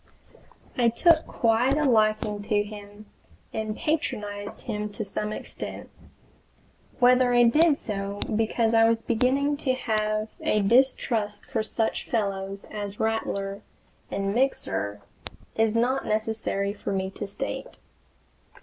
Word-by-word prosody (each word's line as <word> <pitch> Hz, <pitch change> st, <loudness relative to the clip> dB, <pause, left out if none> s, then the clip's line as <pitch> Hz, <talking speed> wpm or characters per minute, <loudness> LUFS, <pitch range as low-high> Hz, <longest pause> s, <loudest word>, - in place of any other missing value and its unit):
I 235 Hz, -1 st, +5 dB
took 320 Hz, +7 st, +4 dB
quite 240 Hz, +4 st, +2 dB
a 305 Hz, -, +2 dB
liking 215 Hz, -3 st, +2 dB
to 210 Hz, -2 st, +2 dB
him 205 Hz, 0 st, -11 dB, 0.5 s
and 220 Hz, -1 st, -3 dB
patronized 210 Hz, -10 st, -2 dB
him 210 Hz, 0 st, -3 dB
to 215 Hz, -, -4 dB
some 210 Hz, +2 st, -3 dB
extent. -, -, -7 dB, 1.1 s
Whether 250 Hz, 0 st, +5 dB
I 240 Hz, -, +6 dB
did 300 Hz, +6 st, +5 dB
so 200 Hz, -3 st, -4 dB, 0.2 s
because 225 Hz, +1 st, +1 dB
I 225 Hz, 0 st, +6 dB
was 225 Hz, 0 st, 0 dB
beginning 265 Hz, +5 st, +1 dB
to 265 Hz, -3 st, 0 dB
have 215 Hz, -3 st, -1 dB
a 210 Hz, -, +2 dB
distrust 225 Hz, -2 st, +2 dB
for -, -, -1 dB
such 220 Hz, +1 st, -2 dB
fellows 195 Hz, -3 st, -2 dB
as 205 Hz, -1 st, -5 dB
Rattler 200 Hz, -3 st, -1 dB, 0.5 s
and 195 Hz, 0 st, -1 dB
Mixer 105 Hz, -, -1 dB, 0.5 s
is 220 Hz, 0 st, +2 dB
not 250 Hz, +3 st, +1 dB
necessary 215 Hz, -2 st, -1 dB
for 200 Hz, -, -5 dB
me 190 Hz, -1 st, -1 dB
to 205 Hz, +1 st, -6 dB
state. 200 Hz, -, -5 dB
215 Hz, 125 wpm, -26 LUFS, 205-240 Hz, 1.1 s, I